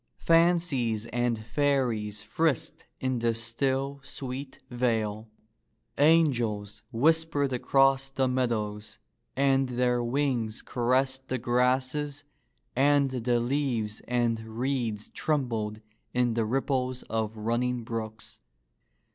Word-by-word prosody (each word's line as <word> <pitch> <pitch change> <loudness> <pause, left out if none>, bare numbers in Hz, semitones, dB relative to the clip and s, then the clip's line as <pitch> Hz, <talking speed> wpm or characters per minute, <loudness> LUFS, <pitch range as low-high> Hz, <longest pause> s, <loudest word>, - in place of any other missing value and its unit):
Fan 170 +1 +5
cies 120 -10 -1
and 120 -1 +1
fairies 115 -5 0
frisked 160 -7 -1
in 130 -2 -1
the 115 0 +1
still, 135 +4 -1
sweet 135 0 -6
vale. 110 -3 -1 0.7
Angels 120 -10 +2
whispered 145 +1 +2
across 135 +1 +3
the 135 -1 0
meadows 110 -5 -2 0.4
and 135 0 +3
their 125 0 +1
wings 120 -3 -1
caressed 130 +2 0
the 130 - -1
grasses 130 +4 0 0.5
and 140 +1 +4
the 120 -1 +1
leaves 120 -4 -1
and 120 -2 +1
reeds 115 -1 -3
trembled 115 -8 -1 0.3
in 125 -1 +2
the 115 -1 0
ripples 130 +1 -1
of 110 -1 -3
running 120 +3 -1
brooks. 110 -1 -6
125 Hz, 105 wpm, -28 LUFS, 115-135 Hz, 0.7 s, Fan